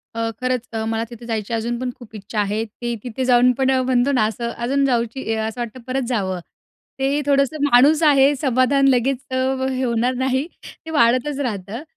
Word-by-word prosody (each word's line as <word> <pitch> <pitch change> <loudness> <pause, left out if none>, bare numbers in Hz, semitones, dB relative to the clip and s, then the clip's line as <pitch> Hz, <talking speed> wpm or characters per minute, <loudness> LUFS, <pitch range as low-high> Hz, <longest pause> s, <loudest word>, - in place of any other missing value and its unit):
अ, 230 0 -1
खरंच 255 -1 -1
अ, 220 - -2
मला 225 0 -1
तिथे 235 -1 -11
जायची 225 -1 -3
अजून 230 +1 -1
पण 255 0 -2
खूप 225 -2 -13
इच्छा 210 +1 -5
आहे. 210 +2 0
ते 235 +2 -5
तिथे 250 +1 -3
जाऊन 250 0 +5
पण 265 0 +2
अ, 260 -1 +2
म्हणतो 255 +1 +2
ना, 250 -5 +3
असं 235 +2 -3
अजून 275 +4 +1
जाऊची 235 -1 -1
अ, - - -3
असं 230 +2 -5
वाटतं 235 +2 -6
परत 265 +1 -1
जावं. 190 -7 -1 0.6
ते 275 +2 +1
थोडंसं 280 +1 +2
माणूस 285 +6 +5
आहे 285 -1 +5
समाधान 275 0 +2
लगेच 260 +1 +2
अ, 260 - -1 0.3
हे 260 0 -2
होणार 240 +1 +1
नाही, 260 +3 0 0.4
ते - - -8
वाढतच 270 0 +2
राहतं. 220 -1 -4
250 Hz, 195 wpm, -21 LUFS, 230-270 Hz, 0.6 s, जाऊन